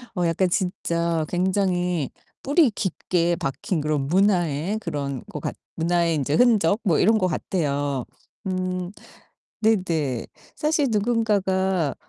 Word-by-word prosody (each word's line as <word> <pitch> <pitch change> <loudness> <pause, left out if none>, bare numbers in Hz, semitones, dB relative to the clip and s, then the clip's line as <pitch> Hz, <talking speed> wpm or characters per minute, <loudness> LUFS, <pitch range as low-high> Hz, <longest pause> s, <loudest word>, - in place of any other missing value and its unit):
어 175 -1 +1
약간 180 +2 +1
진짜 170 -3 0
굉장히 180 -4 0 0.3
뿌리 285 0 +4
깊게 175 -3 0
박힌 150 +4 -2
그런 150 -2 -1
문화의 180 0 +2
그런 140 - -4
것 - - -6
같 - - -4 0.2
문화의 170 0 +1
인제 145 +1 0
흔적 220 -5 +4
뭐 170 -7 +2
이런 220 +4 +4
것 185 -3 +1
같아요. 145 -6 -1 0.4
음 185 -1 -2 0.7
네네. 165 - +1 0.3
사실 300 -2 +1
누군가가 195 - +1
180 Hz, 230 characters per minute, -24 LUFS, 160-200 Hz, 0.7 s, 뿌리